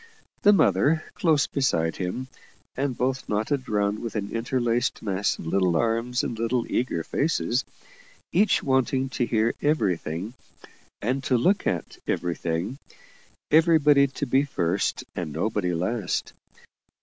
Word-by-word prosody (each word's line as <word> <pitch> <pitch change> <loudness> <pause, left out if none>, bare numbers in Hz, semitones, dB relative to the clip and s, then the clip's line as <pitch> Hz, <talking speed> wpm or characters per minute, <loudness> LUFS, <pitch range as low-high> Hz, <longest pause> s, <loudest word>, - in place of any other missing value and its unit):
The 205 - +7
mother 160 -5 +3
close 155 -4 +2
beside 85 - 0
him, 95 +8 -3 0.5
and 135 -2 -2
both 130 +1 -1
knotted 110 +6 -1
round 105 0 0
with 115 -1 -6
an 105 -1 -3
interlaced 120 +1 0
mass 100 -1 0
of - - -9
little 90 0 +2
arms 115 +4 0
and 115 - -4
little 115 +1 0
eager 100 -10 -1
faces, 140 - 0 0.7
each 205 +5 +3
wanting 130 0 +1
to 125 -2 -1
hear 110 0 +1
everything 100 - -1 0.7
and 130 +5 -1
to 125 - +3
look 185 - +2
at - - -3
everything 85 +7 -2 0.7
everybody 150 -3 +5
to 140 +2 -4
be 135 +1 +3
first 95 -9 -1
and 75 - -4
nobody 90 +3 -1
last. 95 +5 -2
120 Hz, 130 wpm, -25 LUFS, 100-135 Hz, 0.7 s, The